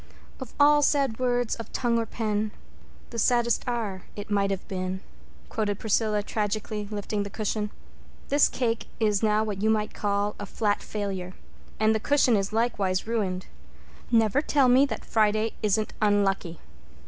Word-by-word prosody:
"'Of 260 -4 -9
all 295 +1 +6
sad 275 -6 +2
words 245 -2 +1
of 230 -2 -7
tongue 235 -2 +1
or 225 - -2
pen 215 -1 -1 0.6
The 230 - -3
saddest 235 0 +2
are 215 -6 -3
it 205 +1 -7
might 200 -1 +2
have 195 -1 -3
been,'" 185 -1 -3 0.5
quoted 210 -3 -1
Priscilla 215 -1 +1
tragically, 210 0 -2
lifting 205 0 -3
the 200 - -4
cushion. 210 0 -2 0.6
"This 285 +1 +5
cake 230 -3 -1
is 210 -3 +2
now 215 -1 +3
what 205 -3 -4
you 220 - +2
might 215 -1 +1
call 205 0 -1
a 205 - -5
flat 205 0 0
failure. 190 -3 -4 0.4
And 220 0 +4
the 220 - 0
cushion 275 -1 +3
is 195 0 0
likewise 210 -5 0
ruined. 200 -5 -1 0.6
Never 225 +3 +3
tell 285 -3 +3
me 260 +3 +5
that - - -5
Friday 215 0 +2
isn't 215 0 +1
unlucky." 195 -5 +1
215 Hz, 160 wpm, -26 LUFS, 205-230 Hz, 0.6 s, all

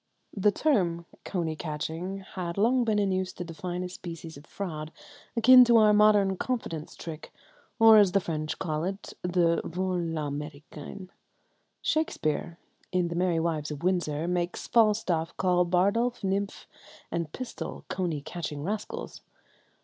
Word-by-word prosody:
The 205 +1 +3
term 180 - +1 0.2
coney 165 -4 -2
catching 160 +5 -4
had 175 -1 -4
long 245 +5 +3
been 220 -2 +1
in 200 -2 +2
use 185 0 -1
to - - -6
define 175 +1 -5
a - - -3
species 165 -3 -8
of 145 +2 -14
fraud 155 -6 -5 0.5
akin 250 +2 +9
to 235 -1 +5
our 215 -1 +6
modern 205 -2 +4
"confidence 175 -12 -3
trick," 160 -2 -8 0.5
or, 225 -1 +9
as 200 -3 +5
the 195 - +5
French 155 -4 -3
call 155 -3 -2
it, 195 +2 -5
the 175 -2 +2
vol 185 +2 -2
à 165 -1 -2
l'Americain. 150 +4 -6 0.7
Shakespeare, 170 - -1 0.3
in 180 -2 +1
the 170 - -4
"Merry 175 -1 +1
Wives 160 -2 -1
of 150 +1 -6
Windsor," 170 -4 0
makes 175 0 -2
Falstaff 205 -8 +2
call 180 -1 +3
Bardolph, 200 +8 +1
Nym, 195 +1 +1 0.6
and 170 -3 -2
Pistol 255 +6 -6
"coney 170 -6 -2
catching 155 -2 -5
rascals." 215 - -5
180 Hz, 145 wpm, -28 LUFS, 160-200 Hz, 0.7 s, akin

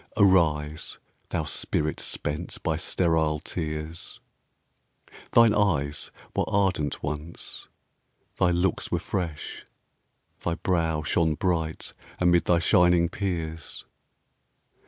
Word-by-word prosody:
Arise, 80 -6 +3 0.3
thou - - -1
spirit 75 0 -1
spent 75 +4 -3
by - - +1
sterile 80 -3 +1
tears; 80 0 -4 1.1
Thine 115 -2 +6
eyes 75 -9 +1 0.3
were - - +2
ardent 95 -7 +1
once, 75 +3 -5 0.7
thy 90 - +4
looks 90 +2 +1
were - - +2
fresh, 85 -5 -4 0.7
Thy 85 - -1
brow 80 -4 0
shone 80 +1 +2
bright 80 -3 -1 0.2
amid 85 -1 +3
thy 90 - +4
shining 90 -1 +4
peers. 85 -5 -4
85 Hz, 95 wpm, -26 LUFS, 75-90 Hz, 1.1 s, Thine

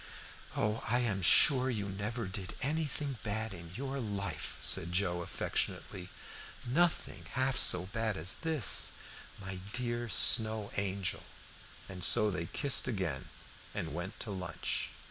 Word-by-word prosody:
"Oh, 105 +2 -2
I 120 - +1
am 105 -5 -2
sure 130 - +8
you 105 -5 -4
never 105 +4 -5
did 95 0 -7
anything 145 -2 -3
bad 110 0 -4
in 85 -2 -11
your 135 +2 -5
life," 100 - -5
said 85 - +2
Joe 90 -1 -1
affectionately. 90 +1 -3 0.6
"Nothing 165 +7 -1
half 130 0 0
so 90 -5 +4
bad 110 +1 -4
as 80 +4 -1
this 160 -9 +3 0.5
my 95 -1 -8
dear 120 -1 -3
Snow 110 -1 +5
Angel!" 100 -2 -3 0.7
And 95 -2 -7
so 105 +4 +5
they 85 -3 -5
kissed 140 -4 +1
again 95 - -4 0.5
and 80 - -5
went 90 +5 -7
to 105 - -6
lunch. 90 -4 -4
105 Hz, 135 wpm, -31 LUFS, 95-125 Hz, 0.7 s, sure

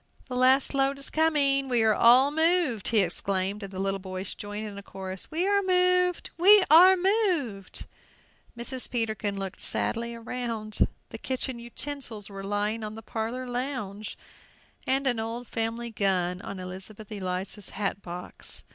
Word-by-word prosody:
"The 250 - -4
last 260 +2 +4
load 275 0 +1
is 275 - -3
coming! 280 -4 +2
We 240 -3 +3
are 220 -1 +4
all 250 +6 +6
moved!" 320 - +2
he 220 -2 +4
exclaimed; 190 +2 0
and 195 -1 -7
the 190 - -8
little 195 0 -1
boys 185 0 -5
joined 205 +1 -6
in 205 - -8
a - - -8
chorus, 190 -1 -6
"We 335 +4 0
are 400 0 +3
moved! 360 -1 +2
we 400 +3 +8
are 365 +4 +9
moved!" 355 - 0 0.7
Mrs. 250 +2 -4
Peterkin 220 -4 -1
looked 195 -1 -5
sadly 235 0 -2
round; 230 -2 -2 0.2
the 225 - -8
kitchen 260 -1 -3
utensils 240 -3 -6
were 195 0 -7
lying 205 +2 -1
on 215 0 -6
the 225 - -10
parlor 230 +4 -4
lounge, 245 -5 -4 0.7
and 270 +1 +2
an 245 -4 +2
old 230 +2 -4
family 230 +1 -3
gun 185 -3 0
on 195 -2 -7
Elizabeth 190 +4 -9
Eliza's 190 0 -3
hat 200 0 -3
box. 175 0 -8
230 Hz, 155 wpm, -27 LUFS, 200-275 Hz, 0.7 s, are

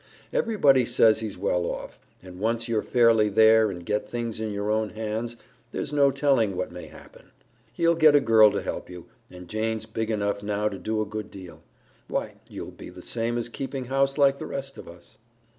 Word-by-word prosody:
Everybody 145 - +3
says 110 -2 +4
he's 110 -3 -5
well 90 0 0
off, - - -6 0.2
and 90 -1 -11
once 115 +2 -1
you're 115 -2 0
fairly 115 -3 +3
there 110 +1 +5
and 90 -3 -7
get 105 +3 -2
things 115 -2 -4
in 110 -1 -3
your 100 +1 -2
own 110 0 0
hands, 110 +2 -4 0.3
there's 150 - -4
no 140 -1 +4
telling 135 -7 +1
what 90 0 -3
may 90 0 -9
happen. - - -16 0.4
He'll 170 0 +2
get 155 -3 +5
a - - +7
girl 110 -5 +6
to - - -3
help - - -5
you, 90 -2 -10 0.2
and 90 -1 -12
Jane's 110 +2 -2
big 110 0 -4
enough 100 -2 -1
now 105 +1 -1
to 100 -2 -8
do 110 0 -1
a - - -6
good 105 +1 -6
deal. 95 -3 -12 0.5
Why, - - -3
you'll - - -7
be - - -11
the - - -12
same 115 0 -2
as 120 - -2
keeping 135 +2 -5
house 135 +2 0
like 140 -1 +3
the - - -6
rest 135 0 -6
of - - -11
us." 85 +3 -15
110 Hz, 205 wpm, -25 LUFS, 105-125 Hz, 0.5 s, a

